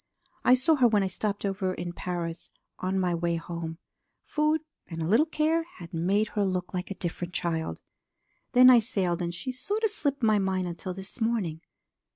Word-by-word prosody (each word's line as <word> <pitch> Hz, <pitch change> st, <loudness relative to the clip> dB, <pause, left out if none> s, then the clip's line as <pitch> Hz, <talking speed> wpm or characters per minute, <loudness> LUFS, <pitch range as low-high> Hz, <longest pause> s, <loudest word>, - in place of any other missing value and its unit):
I 250 Hz, -, +7 dB
saw 290 Hz, +5 st, +3 dB
her 250 Hz, -3 st, +6 dB
when 210 Hz, -3 st, +3 dB
I -, -, +1 dB
stopped 205 Hz, +2 st, -2 dB
over 190 Hz, -1 st, -1 dB
in 175 Hz, 0 st, -5 dB
Paris 175 Hz, -2 st, -4 dB, 0.3 s
on 190 Hz, +1 st, 0 dB
my 180 Hz, -2 st, +1 dB
way 170 Hz, 0 st, 0 dB
home. 165 Hz, -1 st, -5 dB, 0.5 s
Food 305 Hz, +1 st, +1 dB, 0.3 s
and 165 Hz, -2 st, -6 dB
a 160 Hz, -, -1 dB
little 235 Hz, -, +4 dB
care 315 Hz, +1 st, +1 dB, 0.2 s
had 170 Hz, -1 st, -10 dB
made 195 Hz, +6 st, +1 dB
her 205 Hz, -, 0 dB
look 185 Hz, -2 st, -2 dB
like 180 Hz, 0 st, -3 dB
a 195 Hz, -, -4 dB
different 175 Hz, 0 st, -4 dB
child. 160 Hz, -2 st, -2 dB, 0.7 s
"Then 255 Hz, 0 st, +9 dB
I 245 Hz, -, +8 dB
sailed, 190 Hz, -6 st, 0 dB
and 170 Hz, -1 st, -1 dB
she 215 Hz, +10 st, -4 dB
sort 410 Hz, -, -3 dB
of 440 Hz, -, +3 dB
slipped 285 Hz, -, -2 dB
my 215 Hz, -2 st, +4 dB
mind 190 Hz, -1 st, 0 dB
until 180 Hz, +1 st, -5 dB
this 195 Hz, +5 st, -7 dB
morning. 205 Hz, -9 st, 0 dB
190 Hz, 195 wpm, -28 LUFS, 175-245 Hz, 0.7 s, Then